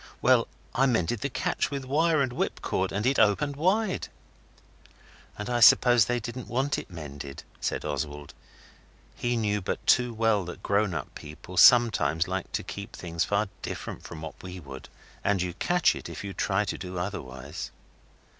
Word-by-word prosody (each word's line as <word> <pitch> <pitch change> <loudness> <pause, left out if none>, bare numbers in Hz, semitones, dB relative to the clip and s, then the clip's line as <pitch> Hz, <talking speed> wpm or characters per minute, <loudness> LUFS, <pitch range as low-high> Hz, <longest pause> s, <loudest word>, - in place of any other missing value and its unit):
Well, - - +4 0.3
I 135 +2 +3
mended 110 -2 0
the 140 - -1
catch - - -1
with 140 -2 -4
wire 155 +2 +3
and 125 -2 -2
whip - - -2
cord 95 0 -1
and 105 +3 -2
it 135 +2 +2
opened 115 +7 +3
wide.' 190 +6 +1 1.3
'And 105 - -5
I 120 -1 0
suppose 120 0 +7
they 120 +2 0
didn't 120 +2 -6
want 135 +4 0
it - - -10
mended,' 70 -5 -8 0.2
said - - -2
Oswald. 75 -1 -4 0.8
He 120 0 -1
knew 105 -2 0
but 90 - -4
too 125 -1 +4
well 110 -3 +2
that 90 - -9
grown 100 -2 +1
up - - -5
people 75 +4 -10
sometimes 90 -8 +5
like 95 0 -3
to - - -1
keep 100 +3 -7
things 85 -1 -2
far 105 +1 +1
different - - -6
from 80 -2 -9
what 80 - -8
we 90 0 -8
would, 70 -4 -10 0.3
and 100 -2 +2
you 90 -1 -2
catch 175 - +2
it - - -7
if - - -7
you 100 -1 -5
try 105 +2 0
to - - -4
do 90 -1 -6
otherwise. 85 -9 -5
105 Hz, 175 wpm, -27 LUFS, 90-125 Hz, 1.3 s, suppose